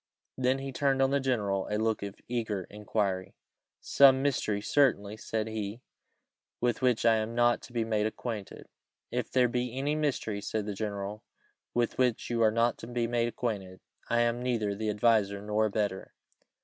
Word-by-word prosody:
Then 130 +1 +1
he 135 0 -5
turned 135 0 +1
on 135 0 +3
the 140 - +3
general 105 -8 0
a 105 - 0
look 110 0 0
of 100 0 -5
eager 110 -5 -2
inquiry. 100 -3 -2 0.5
"Some 135 -1 +6
mystery, 120 -7 0
certainly," 105 -3 +2
said 110 0 -3
he, 110 +1 -5 0.8
"with 120 +1 0
which 125 -3 +2
I 115 -1 +6
am 110 +1 -3
not 120 0 +3
to - - -12
be 115 -2 -1
made 110 -1 +1
acquainted?" 110 -2 -6 0.4
"If 125 0 -2
there 125 -1 +4
be 125 +1 -2
any 145 +2 0
mystery," 140 -9 -1
said 110 +1 -2
the 105 - -3
general, 100 0 -4 0.5
"with 120 0 0
which 125 -2 +1
you 115 -1 +1
are 110 - +6
not 115 +2 +1
to - - -8
be 120 -1 -1
made 120 0 +1
acquainted, 100 -6 -4 0.3
I 120 0 +3
am 120 +1 +1
neither 115 -5 0
the 110 +2 -2
adviser 105 -2 +2
nor 105 +1 +1
abettor. 100 -2 -2
115 Hz, 175 wpm, -30 LUFS, 105-125 Hz, 0.8 s, Some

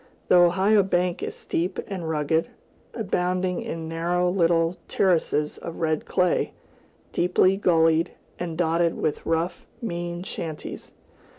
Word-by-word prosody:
The - - +6
Ohio 190 +4 +5
bank 180 -2 0
is - - -4
steep 180 +3 -2
and 180 -5 -5
rugged, 160 +1 +1 0.5
abounding 185 -4 -1
in 160 0 -5
narrow 175 +2 0
little 170 -1 +2
terraces 160 -5 +1
of 170 - -7
red 155 -2 -1
clay, 180 -2 +1 0.6
deeply 180 +2 +3
gullied, 165 -3 +3 0.3
and 170 -2 -4
dotted 170 0 +2
with 150 - -1
rough, 165 +2 -1
mean 175 -5 -4
shanties. 160 -4 -6
175 Hz, 120 wpm, -25 LUFS, 165-180 Hz, 0.6 s, The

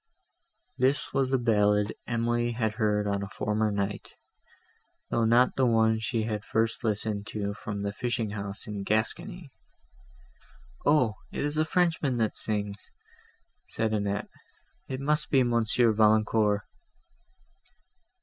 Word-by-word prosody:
This 135 +3 +1
was 135 -2 +2
the 135 - +2
ballad 105 -3 +2
Emily 120 0 0
had 110 -2 -1
heard 105 -2 +1
on 100 -1 -1
a 100 - -5
former 105 +2 -1
night, 100 0 -3 1.0
though 115 - +2
not 120 +3 +4
the 130 -1 +3
one 110 -1 +3
she 110 0 -1
had 105 -2 -3
first 115 +2 -1
listened 105 -1 -1
to 100 -1 -3
from 100 -1 -5
the 100 0 -2
fishing 115 -2 -2
house 100 -1 -5
in 105 -2 -5
Gascony. 115 - -2 1.4
"O! 125 -8 +3
it - - -2
is 145 +1 -2
a 155 +1 +2
Frenchman, 160 -6 +1
that 110 -2 0
sings," 105 -2 -2 0.8
said 110 -1 -1
Annette: 100 -1 -2 0.6
"it 130 - -4
must 150 +2 +1
be 135 -2 +4
Monsieur 120 0 +3
Valancourt." 110 -1 +3
110 Hz, 130 wpm, -28 LUFS, 105-120 Hz, 1.4 s, not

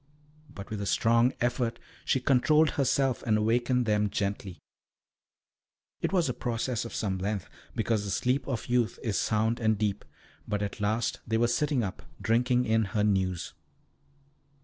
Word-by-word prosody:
But 100 -7 -10
with 105 -2 -3
a 100 - -3
strong 115 +10 +3
effort 120 -1 0 0.3
she 130 - +2
controlled 150 +5 +4
herself 135 -2 +1
and 110 -2 +2
awakened 120 +3 +1
them 105 -1 +2
gently. 100 -2 -3 1.4
It - - 0
was 180 -5 +2
a 125 - -1
process 120 0 -2
of 115 - -7
some 95 -3 -1
length, 100 0 -2 0.3
because 110 -2 0
the 100 - -4
sleep 125 +6 0
of 130 -5 -3
youth 120 -2 +1
is 105 -6 0
sound 110 +2 +1
and 110 -2 +2
deep, 105 -1 -1 0.4
but 105 -1 -1
at 100 +1 -5
last 110 +2 0
they 110 0 +1
were 120 +1 +3
sitting 140 +1 +1
up, 95 -3 -5 0.2
drinking 125 +2 +2
in 110 0 +2
her 105 +2 -1
news. 95 -4 0
115 Hz, 160 wpm, -29 LUFS, 105-125 Hz, 1.4 s, controlled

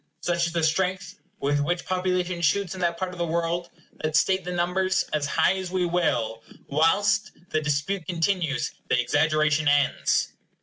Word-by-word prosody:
Such 170 -1 +1
is 170 - -6
the 170 -1 0
strength 185 +4 -1 0.2
with 145 +1 +1
which 175 +5 -1
population 180 -1 -1
shoots 180 +4 +1
in 190 - -7
that 170 -1 0
part 185 +1 -3
of 180 - -10
the 170 - +1
world, 170 +1 -1 0.3
that, 155 0 -1
state 190 +3 +3
the 180 - -5
numbers 180 +1 +1
as 150 -1 0
high 175 - +3
as 185 -1 -4
we 185 0 0
will, 120 -11 0 0.2
whilst 205 +8 +2 0.2
the 155 - +1
dispute 150 +5 -1
continues, 165 -6 0 0.2
the 125 - +3
exaggeration 155 +3 +2
ends. 145 0 +2
170 Hz, 170 wpm, -25 LUFS, 155-185 Hz, 0.3 s, state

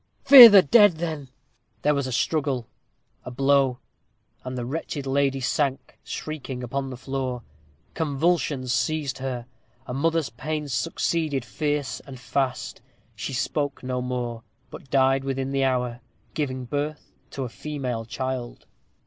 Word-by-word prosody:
"Fear 260 -4 +12
the 200 -2 +8
dead, 205 +5 +6
then." 155 -4 -5 0.5
There 150 - +3
was 140 -2 -1
a - - -4
struggle 135 -2 -1 0.6
a - - -7
blow 135 0 +2 0.7
and 130 0 -5
the 120 - -3
wretched 145 +1 -4
lady 135 0 +1
sank, 135 0 -1
shrieking, 135 -5 -6
upon 135 +2 -3
the 130 - -7
floor. 130 -2 -4 0.5
Convulsions 150 -4 0
seized 140 +2 -1
her. 130 -2 -4 0.4
A 125 - -6
mother's 160 +2 0
pains 150 +3 -4
succeeded 140 +3 -1
fierce 145 +3 -2
and 135 -3 -11
fast. 130 -1 -2 0.3
She 120 +5 -5
spoke 145 +2 -2
no 125 0 -2
more, 125 -2 -3 0.3
but 135 - -11
died 135 0 +3
within 135 0 -2
the 135 0 +1
hour, 125 -2 -1 0.3
giving 130 -4 -3
birth 145 +3 -4 0.2
to 135 - -5
a - - -3
female 130 -4 -4
child. 130 0 -5
135 Hz, 140 wpm, -25 LUFS, 125-150 Hz, 0.7 s, Fear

